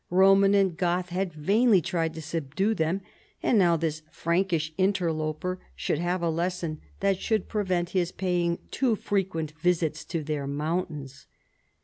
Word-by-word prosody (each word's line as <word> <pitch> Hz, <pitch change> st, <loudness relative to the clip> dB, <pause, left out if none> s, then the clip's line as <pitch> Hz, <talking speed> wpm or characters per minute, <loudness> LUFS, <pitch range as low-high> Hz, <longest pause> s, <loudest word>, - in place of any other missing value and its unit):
Roman 195 Hz, +2 st, +5 dB
and 195 Hz, -4 st, +3 dB
Goth 180 Hz, +1 st, 0 dB
had 185 Hz, +1 st, -1 dB
vainly 200 Hz, +8 st, +3 dB
tried 165 Hz, -1 st, -1 dB
to 160 Hz, -, -6 dB
subdue 165 Hz, +6 st, -1 dB
them, 170 Hz, +1 st, 0 dB, 0.4 s
and 225 Hz, -, +4 dB
now 170 Hz, -3 st, +4 dB
this 155 Hz, -1 st, -2 dB
Frankish 170 Hz, -2 st, 0 dB
inter 185 Hz, -2 st, +2 dB
loper 155 Hz, +4 st, -3 dB, 0.2 s
should 150 Hz, -, -1 dB
have 175 Hz, +1 st, -1 dB
a 170 Hz, -, +2 dB
lesson 170 Hz, -1 st, -2 dB, 0.2 s
that 195 Hz, -1 st, +2 dB
should 220 Hz, -4 st, 0 dB
prevent 185 Hz, -5 st, 0 dB
his 180 Hz, -3 st, 0 dB
paying 175 Hz, -2 st, 0 dB
too 250 Hz, -5 st, +2 dB
frequent 190 Hz, -7 st, -1 dB
visits 165 Hz, -2 st, +1 dB
to 165 Hz, -2 st, -3 dB
their 145 Hz, -2 st, -3 dB
mountains. 150 Hz, -2 st, -3 dB
175 Hz, 150 wpm, -27 LUFS, 160-190 Hz, 0.4 s, Roman